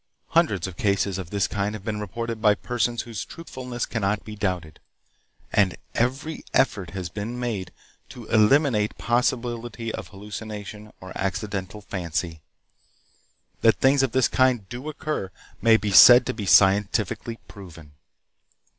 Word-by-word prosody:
Hundreds 155 - +2
of 95 -3 -7
cases 100 -1 0
of 90 -3 -7
this 100 0 0
kind 100 +1 -2
have 105 -2 -10
been 110 -2 -2
reported 115 +2 -5
by 105 -2 +5
persons 120 0 -1
whose 110 -6 -6
truthfulness 125 -7 -6
cannot 105 -2 -2
be 110 - -8
doubted, 90 -6 -3 0.7
and 95 -4 +2 0.2
every 135 +6 -1
effort 100 -9 +2
has 90 -2 -3
been 110 +7 -5
made 110 -7 -3 0.4
to 120 - -10
eliminate 110 0 +3
possibility 120 -1 -1
of - - -6
hallucination 105 +1 -8
or 95 0 -10
accidental 95 +1 -3
fancy. 85 -4 -4 1.2
That 115 - +5
things 135 +1 +3
of 135 -3 +1
this 130 0 +3
kind 125 -6 +2
do 125 +5 -6
occur 150 -9 -4 0.3
may 115 -1 +6
be 105 -1 -3
said 120 +5 +9
to 130 - -2
be 105 -4 -5
scientifically 100 +4 +3
proven. 85 -7 -12
105 Hz, 140 wpm, -24 LUFS, 100-120 Hz, 1.2 s, said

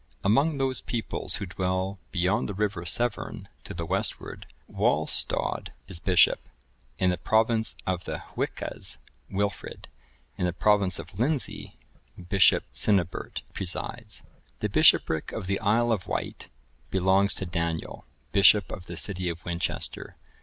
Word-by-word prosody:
(1017) 100 - +3
Among 145 +4 +2
those 135 -2 +1
peoples 115 -2 -2
who - - -3
dwell 95 +1 -2
beyond 95 +5 +1
the 100 - -4
river 100 -4 -1
Severn 120 +9 -1 0.2
to - - -8
the 85 -1 -3
westward,(1018) - - -4
Walhstod - - +1 0.2
is 90 -4 -5
bishop; 90 0 +4 0.6
in 90 -1 +3
the 90 - -2
province 110 +3 +2
of 90 -1 -2
the - - -3 0.2
Hwiccas, - - -2 0.3
Wilfrid;(1019) 100 +1 -3 0.5
in 90 - +1
the 90 - -1
province 100 -1 +3
of 85 +5 -9
Lindsey, 140 +2 -1 0.4
Bishop 95 +2 +4
Cynibert(1020) 95 -5 0
presides; 90 -2 -4 0.4
the - - -1
bishopric 80 -1 +4
of 105 - -4
the 100 +1 0
Isle 115 +3 +2
of 105 -6 0
Wight(1021) - - -4 0.4
belongs 95 +3 +3
to 95 - -2
Daniel, 85 -1 -3 0.3
bishop 100 0 +6
of 90 - -7
the 85 - -6
city 95 -2 0
of 85 -1 -6
Winchester. 85 0 -3
95 Hz, 140 wpm, -27 LUFS, 90-105 Hz, 0.6 s, bishop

